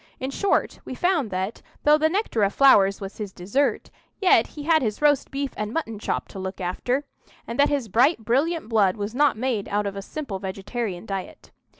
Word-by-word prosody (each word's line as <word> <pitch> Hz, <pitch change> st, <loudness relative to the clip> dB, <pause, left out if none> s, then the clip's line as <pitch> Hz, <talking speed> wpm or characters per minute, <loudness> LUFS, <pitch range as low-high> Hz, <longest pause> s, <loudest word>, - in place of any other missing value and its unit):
In 260 Hz, +1 st, -3 dB
short, 400 Hz, +8 st, 0 dB
we 255 Hz, -, -7 dB
found 335 Hz, -, +1 dB
that, 190 Hz, +3 st, -3 dB, 0.2 s
though 300 Hz, +1 st, +5 dB
the 315 Hz, +1 st, +3 dB
nectar 375 Hz, -, -1 dB
of 200 Hz, 0 st, +2 dB
flowers 200 Hz, -8 st, +5 dB
was 195 Hz, +2 st, -8 dB
his 205 Hz, -3 st, -4 dB
dessert, 205 Hz, +11 st, -1 dB, 0.3 s
yet 380 Hz, -, +4 dB
he 295 Hz, -, -5 dB
had 320 Hz, +1 st, +3 dB
his 215 Hz, -4 st, -2 dB
roast 290 Hz, -2 st, +3 dB
beef 275 Hz, -1 st, -3 dB
and 210 Hz, 0 st, -3 dB
mutton 225 Hz, -8 st, -3 dB
chop -, -, -2 dB
to 195 Hz, -, -8 dB
look 190 Hz, 0 st, -5 dB
after, 245 Hz, +9 st, -1 dB, 0.4 s
and 235 Hz, +3 st, -6 dB
that 285 Hz, -, +5 dB
his 280 Hz, -5 st, -1 dB
bright, 235 Hz, -, +2 dB
brilliant 295 Hz, +6 st, +1 dB
blood 215 Hz, -4 st, +2 dB
was 205 Hz, +1 st, -4 dB
not 285 Hz, -2 st, +3 dB
made 235 Hz, -4 st, -2 dB
out 205 Hz, +1 st, 0 dB
of 200 Hz, -1 st, -3 dB
a 200 Hz, -, -4 dB
simple 215 Hz, -3 st, -6 dB
vegetarian 195 Hz, +1 st, -4 dB
diet. 195 Hz, -3 st, -6 dB
230 Hz, 205 wpm, -24 LUFS, 200-285 Hz, 0.4 s, though